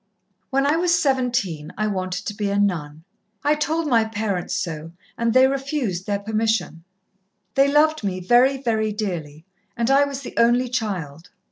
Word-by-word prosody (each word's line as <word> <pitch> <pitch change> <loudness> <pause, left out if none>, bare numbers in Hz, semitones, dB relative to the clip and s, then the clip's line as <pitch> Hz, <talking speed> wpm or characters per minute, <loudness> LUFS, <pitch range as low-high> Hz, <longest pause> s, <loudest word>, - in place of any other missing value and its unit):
"When 275 +1 +1
I 295 +3 +2
was 345 0 +3
seventeen 245 - 0
I 215 - 0
wanted 185 -3 -3
to 210 - -3
be 205 -1 -2
a 200 - 0
nun. 160 -6 -1 0.4
I 295 +1 +3
told 315 +2 -1
my 235 -6 +3
parents 210 -4 -3
so, 165 -1 -4 0.2
and 235 0 0
they 255 +2 +6
refused 270 - -2
their 205 -1 0
permission. 215 -4 -1 0.7
They 275 +1 +4
loved 310 -1 +3
me 190 -2 -2
very, 245 +8 +4
very 220 -4 0
dearly, 170 -8 -5 0.3
and 235 +2 +1
I 280 +1 +5
was 280 -1 -5
the 260 - -8
only 240 +2 +3
child. 180 - -4
220 Hz, 165 wpm, -22 LUFS, 185-270 Hz, 0.7 s, they